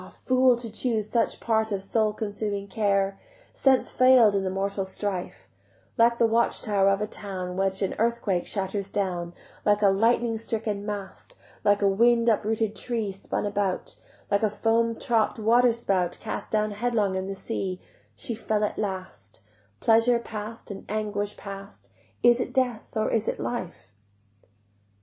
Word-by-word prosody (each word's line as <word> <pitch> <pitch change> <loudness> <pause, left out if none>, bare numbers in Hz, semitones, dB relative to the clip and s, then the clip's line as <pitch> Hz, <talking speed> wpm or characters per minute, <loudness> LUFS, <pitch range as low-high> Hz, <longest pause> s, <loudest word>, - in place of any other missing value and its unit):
fool, 255 -1 +3
to 235 0 -6
choose 220 -2 0
such 230 0 0
part 220 -1 0
Of 195 -1 -2
soul 215 +2 +1
consuming 205 -1 -3
care! 195 -1 0 0.3
Sense 265 -2 +2
fail'd 255 -5 +6
in 195 -1 +1
the 190 - -1
mortal 195 +1 -2
strife: 190 -1 -5 0.5
Like 235 -1 +4
the 235 - +4
watch 230 +1 +2
tower 200 -3 +3
of 195 +1 +1
a - - +1
town 185 -4 -5
Which 195 +1 0
an 190 - -1
earthquake 225 -6 0
shatters 195 0 -2
down, 175 -4 -2 0.3
Like 210 0 +2
a 200 - +7
lightning 225 +3 +2
stricken 215 -2 -3
mast, 205 - -7 0.3
Like 205 0 +3
a - - +5
wind 235 +4 +4
uprooted 220 0 0
tree 225 -5 -2
Spun 190 +2 -4
about, 200 -2 -2 0.4
Like 200 - +3
a 215 - +2
foam 230 +2 +1
topp'd 225 -2 0
waterspout 225 -5 +2
Cast - - -5
down 215 -1 +1
headlong 210 -2 0
in 190 0 -2
the 195 - -4
sea, 190 -3 -4 0.4
She 235 - -3
fell 215 -1 -1
at 210 - -2
last; 185 - -6 0.4
Pleasure 230 +2 +4
past 220 -1 -7
and 195 - -7
anguish 205 -1 -2
past, 195 0 -10 0.3
Is 240 0 +6
it - - -4
death 245 -4 -1
or 215 - 0
is 225 -1 0
it - - -2
life? 175 - -5
210 Hz, 160 wpm, -26 LUFS, 195-230 Hz, 0.5 s, a